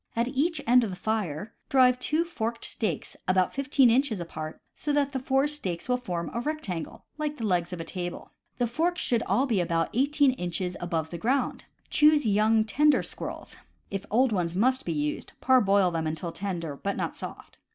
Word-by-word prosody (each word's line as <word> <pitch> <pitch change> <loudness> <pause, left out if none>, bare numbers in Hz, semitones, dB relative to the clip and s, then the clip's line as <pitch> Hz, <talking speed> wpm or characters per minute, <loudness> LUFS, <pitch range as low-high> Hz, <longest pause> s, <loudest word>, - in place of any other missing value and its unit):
At 235 +2 +1
each 295 +4 0
end 245 +1 +5
of 220 - -1
the 185 - -5
fire 210 -2 -2 0.2
drive 255 -3 +5
two 310 +6 +1
forked 230 -8 -3
stakes 220 - -2
about 185 0 +2
fifteen 275 -2 +4
inches 245 -4 +2
apart, 155 -2 -6 0.2
so 295 - -2
that 285 -1 +2
the 265 - -2
four 270 +2 +2
stakes 195 - -3
will 250 0 +2
form 175 -9 -4
a 235 - -1
rectangle, 240 - -4
like 300 -1 -2
the 225 - -3
legs 175 -3 +1
of 180 - -5
a - - -3
table. 175 +1 -6 0.3
The 245 - +1
forks 330 +9 0
should 235 -2 +1
all 265 - +2
be 225 -8 +1
about 165 -1 0
eighteen 285 +2 +3
inches 180 -4 -3
above 165 -2 -2
the 170 - -5
ground. 255 +6 0 0.3
Choose 300 -2 +5
young, 215 +1 +3
tender 295 +7 +3
squirrels - - -7 0.3
(if 195 0 -4
old 250 +3 +3
ones 175 -4 -1
must 255 +6 +2
be 170 - -1
used, 150 -1 -2
parboil 200 -8 +4
them 165 -1 -1
until 160 +2 -3
tender 170 -6 -4
but 200 +7 -3
not - - -2
soft). - - -8
225 Hz, 195 wpm, -27 LUFS, 175-265 Hz, 0.3 s, end